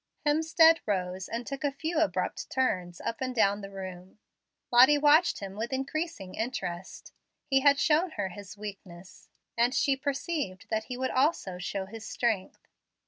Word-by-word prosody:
Hemstead 320 +2 +5
rose 185 -2 -2
and 235 +1 -4
took 275 +4 -6
a 285 - +1
few 315 +3 -2
abrupt 320 - -1
turns 185 -10 -1
up 230 - -4
and 255 -1 -2
down 205 -2 +3
the 195 - -7
room. 185 -1 -9 0.5
Lottie 255 +5 +7
watched 300 +2 +4
him 195 -1 -6
with 225 +4 -4
increasing 270 - -3
interest. 190 -7 -5 0.3
He 270 -2 +3
had 280 +1 +5
shown 325 +4 +3
her 205 -3 -2
his 200 +2 -10
weakness, 190 -3 -10 0.3
and 240 +2 +2
she 275 -2 +3
perceived 280 - -3
that 220 0 0
he 250 - -6
would 260 0 -1
also 255 - +1
show 190 +2 -3
his 220 +3 -10
strength. 220 -6 -2
235 Hz, 160 wpm, -29 LUFS, 195-285 Hz, 0.5 s, Lottie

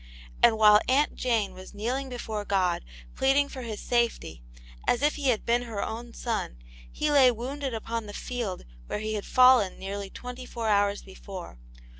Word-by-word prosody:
And 225 -2 +6
while 210 -1 +7
Aunt 280 +3 +3
Jane 225 -6 0
was 185 +2 -12
kneeling 255 +6 -2
before 220 -4 -4
God, 190 -3 0 0.3
pleading 275 +1 +2
for 260 - -7
his 225 -3 -5
safety, 235 - -1 0.5
as 245 - +2
if 295 - +3
he 285 -2 -3
had 230 -4 0
been 240 +1 +2
her 225 -4 -4
own 235 +2 -6
son, 220 - -3 0.3
he 300 0 -1
lay 275 -3 +7
wounded 260 +2 -3
upon 225 0 -4
the - - -7
field 235 -7 -4 0.2
where - - -3
he 215 +1 -3
had 210 -2 -4
fallen 255 -6 +5
nearly 200 +1 -5
twenty 250 +4 -8
four 230 -2 -3
hours 205 0 +2
before. 190 - -10
230 Hz, 175 wpm, -27 LUFS, 205-255 Hz, 0.5 s, while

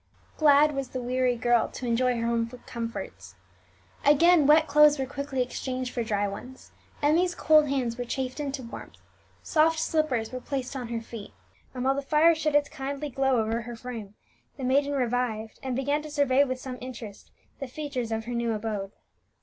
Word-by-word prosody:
Glad 300 0 +5
was 275 -2 -3
the 255 - -4
weary 250 0 0
girl 240 0 +2
to 255 - -7
enjoy 245 +1 +1
her 230 - -1
home 230 0 0 0.2
comforts 195 - -6 0.7
again. 300 +1 +5
Wet 310 +1 +6
clothes 300 0 +6
were 265 - -1
quickly 275 -1 -2
exchanged 255 0 -4
for 240 - -1
dry 205 -2 0
ones; 250 +6 -9 0.3
Emmie's 345 +4 +3
cold 305 -2 +4
hands 250 -4 -1
were - - -1
chafed 255 +2 -4
into 275 -2 -3
warmth; 230 - -10 0.5
soft 320 +1 +3
slippers 290 -10 0
were 255 0 -5
placed 270 -1 -4
on 250 -3 -4
her 230 -1 -3
feet; 225 -2 -9 0.4
and 250 - -3
while 270 - +4
the 280 - -2
fire 305 +4 +4
shed 310 -2 -1
its 290 0 +4
kindly 280 +2 -5
glow 265 -1 +2
over 225 +1 -1
her 240 +1 -7
frame, 225 -4 -8 0.4
the 270 - -7
maiden 280 +3 +2
revived, 245 -4 -1
and 260 -2 -3
began 285 +3 0
to 305 - -9
survey 285 -2 +3
with 255 -2 -3
some 255 -1 -7
interest 240 -5 -9 0.3
the 275 - -4
features 255 -4 -4
of 225 0 -2
her 245 - -4
new 235 -1 0
abode. 210 -2 -4
255 Hz, 185 wpm, -27 LUFS, 235-285 Hz, 0.7 s, Wet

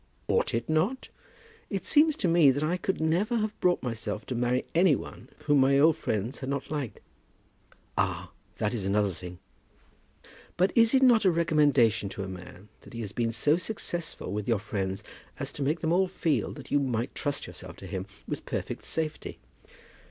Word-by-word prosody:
"Ought - - +1
it 115 0 -2
not? 185 +12 0 0.6
It 195 -2 -3
seems 310 0 +4
to - - 0
me 165 -4 +6
that 140 +3 +1
I 165 +4 +1
could 185 +1 -2
never 175 +9 +1
have 215 -1 -2
brought 180 -1 +2
myself 115 -3 -4
to - - -4
marry 125 +1 0
any 170 -2 +5
one 115 +1 -9
whom 145 -1 +4
my 135 +1 +5
old 155 +2 +6
friends 115 -5 -2
had 130 - -5
not 140 0 -3
liked." 145 -7 -3 1.0
"Ah! - - -1 0.3
that 105 - 0
is 110 -5 -3
another 100 +1 +2
thing." 90 +1 -9 1.2
"But 185 +2 +3
is 230 +2 +5
it 265 - +5
not 240 -4 +6
a 190 - +5
recommendation 145 - +3
to 95 - -5
a - - -5
man 95 +2 -10
that - - -15
he 115 - -5
has 105 -3 -5
been 115 +1 0
so 145 +8 +2
successful 175 - -5
with 105 +1 -3
your 115 -2 +3
friends 95 0 -3 0.4
as 140 0 -4
to 145 - -8
make 150 +4 0
them 160 0 +1
all 190 +1 +3
feel 170 -4 0
that 140 - -11
you 145 - +4
might 125 -4 -1
trust 145 0 -3
yourself 90 -1 -10
to - - -10
him 95 0 -4 0.2
with - - -4
perfect - - -4
safety?" 160 -1 -4
140 Hz, 190 wpm, -28 LUFS, 110-170 Hz, 1.2 s, me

